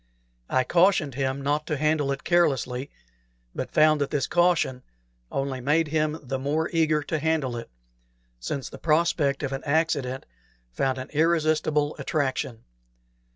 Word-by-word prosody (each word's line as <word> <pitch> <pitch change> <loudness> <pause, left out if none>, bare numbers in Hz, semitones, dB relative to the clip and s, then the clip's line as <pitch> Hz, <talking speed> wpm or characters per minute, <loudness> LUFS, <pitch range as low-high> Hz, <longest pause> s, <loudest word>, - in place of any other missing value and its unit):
I 130 - +2
cautioned 175 -3 +3
him 135 +1 -2
not 145 +2 0
to 150 - -1
handle 150 -1 +1
it 135 - -4
carelessly, 140 -6 +1 0.6
but - - -4
found 155 -1 +4
that 140 - 0
this 145 -3 0
caution 175 -7 +2 0.5
only 135 -1 -2
made 150 +4 +2
him 155 0 0
the 135 0 -3
more 150 +4 -1
eager 155 -2 +2
to 155 +2 -2
handle 150 -5 0
it, 115 - -7 0.7
since 130 - -4
the - - -10
prospect 155 -3 +1
of 140 - -2
an 135 - -4
accident 140 -4 0 0.5
found 130 - -1
an 130 - -7
irresistible 155 -1 +1
attraction. 130 -5 -2
145 Hz, 145 wpm, -25 LUFS, 135-155 Hz, 0.7 s, found